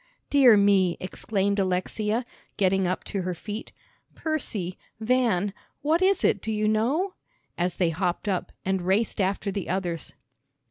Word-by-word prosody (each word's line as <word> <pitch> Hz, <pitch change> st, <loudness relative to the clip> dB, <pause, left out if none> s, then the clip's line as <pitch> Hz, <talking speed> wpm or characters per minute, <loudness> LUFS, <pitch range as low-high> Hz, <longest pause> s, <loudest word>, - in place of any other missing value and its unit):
"Dear 260 Hz, -6 st, +7 dB
me!" 195 Hz, -3 st, +4 dB
exclaimed 200 Hz, +1 st, -1 dB
Alexia, 210 Hz, +5 st, 0 dB, 0.3 s
getting 190 Hz, -1 st, +2 dB
up 185 Hz, -, -2 dB
to 195 Hz, -, -3 dB
her 180 Hz, 0 st, -3 dB
feet. 210 Hz, +5 st, -6 dB, 0.4 s
"Percy 215 Hz, -, -2 dB, 0.2 s
Van 220 Hz, -5 st, +1 dB, 0.3 s
what 320 Hz, +4 st, +2 dB
is 385 Hz, +1 st, +3 dB
it, -, -, +3 dB
do 220 Hz, -, -3 dB
you 215 Hz, 0 st, 0 dB
know?" 265 Hz, -, +1 dB, 0.4 s
as 175 Hz, 0 st, -1 dB
they 175 Hz, -3 st, +1 dB
hopped 180 Hz, +4 st, -2 dB
up, 190 Hz, -3 st, -1 dB
and 190 Hz, -1 st, 0 dB
raced 200 Hz, +4 st, +1 dB
after 195 Hz, +1 st, 0 dB
the 195 Hz, -1 st, -4 dB
others. 175 Hz, -3 st, -2 dB
200 Hz, 145 wpm, -26 LUFS, 185-220 Hz, 0.4 s, Dear